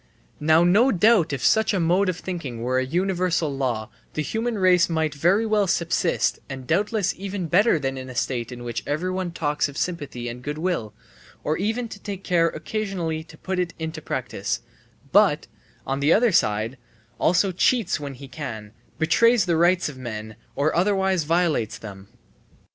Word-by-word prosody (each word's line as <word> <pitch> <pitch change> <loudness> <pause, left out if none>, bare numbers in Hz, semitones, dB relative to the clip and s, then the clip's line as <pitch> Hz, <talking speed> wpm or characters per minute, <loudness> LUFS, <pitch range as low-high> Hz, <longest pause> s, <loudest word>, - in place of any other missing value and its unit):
Now 160 +2 +4
no 210 +10 +5
doubt 200 -3 +4
if 135 -3 -2
such 220 -1 +3
a - - +1
mode 180 +3 +2
of 180 - -2
thinking 145 -12 -5
were 130 +1 +1
a - - +1
universal 175 -1 0
law, 120 -5 -2 0.2
the 155 - 0
human 225 +5 -2
race 185 -3 +4
might 160 -2 0
very 175 +9 +2
well 210 -2 +2
subsist 170 -1 +1
and 135 -2 -7
doubtless 200 - +1
even 195 -1 -4
better 185 +4 +4
than 135 -2 -3
in 130 0 -8
a 130 - -9
state 120 -1 -2
in 120 -1 -8
which 120 -1 -3
everyone 185 +4 -1
talks 150 -3 -1
of 140 - -10
sympathy 145 -9 -3
and 120 +1 -6
good 150 +3 -4
will, 155 - -2 0.5
or 155 - 0
even 220 +6 -1
takes 200 -2 -8
care 170 -2 +3
occasionally 170 -2 -3
to 155 - -15
put 185 +2 -3
it 180 -2 -2
into 160 0 -5
practice, - - -3 0.5
but, - - +4 0.4
on 135 +1 -2
the 145 +3 +3
other 235 +1 +4
side, 110 - +1 0.4
also 185 +3 +3
cheats 190 0 +2
when 140 -2 -6
he 135 +2 -10
can, 120 -7 -7 0.3
betrays 230 +6 +4
the 170 -2 +1
rights 175 +2 +3
of 140 -4 -8
men, 110 -3 -6 0.2
or 145 +2 +1
otherwise 190 -2 +2
violates 165 -9 +1
them. 100 -3 -10
165 Hz, 175 wpm, -24 LUFS, 135-190 Hz, 0.5 s, no